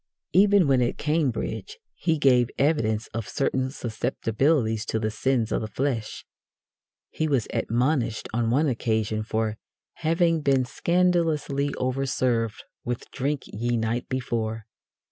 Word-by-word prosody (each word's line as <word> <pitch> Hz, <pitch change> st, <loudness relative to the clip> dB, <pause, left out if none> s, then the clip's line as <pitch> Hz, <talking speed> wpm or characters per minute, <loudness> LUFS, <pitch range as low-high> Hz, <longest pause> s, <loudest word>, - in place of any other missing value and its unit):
Even 200 Hz, -2 st, +5 dB
when 135 Hz, -2 st, +4 dB
at 120 Hz, -, 0 dB
Cambridge 155 Hz, -, -1 dB, 0.2 s
he 165 Hz, -2 st, 0 dB
gave 125 Hz, -4 st, +4 dB
evidence 115 Hz, -7 st, +1 dB
of 115 Hz, -2 st, -4 dB
certain 130 Hz, -1 st, 0 dB
susceptibilities 120 Hz, -1 st, 0 dB
to -, -, 0 dB
the 110 Hz, 0 st, -1 dB
sins 115 Hz, 0 st, 0 dB
of -, -, 0 dB
the 110 Hz, -, -3 dB
flesh. 115 Hz, 0 st, -3 dB, 0.9 s
He 155 Hz, -, -1 dB
was 135 Hz, -7 st, +1 dB
"admonished" 120 Hz, -1 st, 0 dB
on 115 Hz, 0 st, +1 dB
one 140 Hz, +7 st, +3 dB
occasion 110 Hz, -4 st, 0 dB
for 110 Hz, 0 st, -1 dB, 0.4 s
"having 165 Hz, 0 st, +2 dB
been 135 Hz, -3 st, +2 dB
scandalously 165 Hz, -3 st, +1 dB
overserved 125 Hz, -3 st, -1 dB, 0.2 s
with 120 Hz, 0 st, -4 dB
drink 140 Hz, +1 st, -2 dB
ye 120 Hz, +3 st, -2 dB
night 115 Hz, +2 st, -2 dB
before." 115 Hz, -4 st, -2 dB
125 Hz, 125 wpm, -25 LUFS, 115-145 Hz, 0.9 s, Even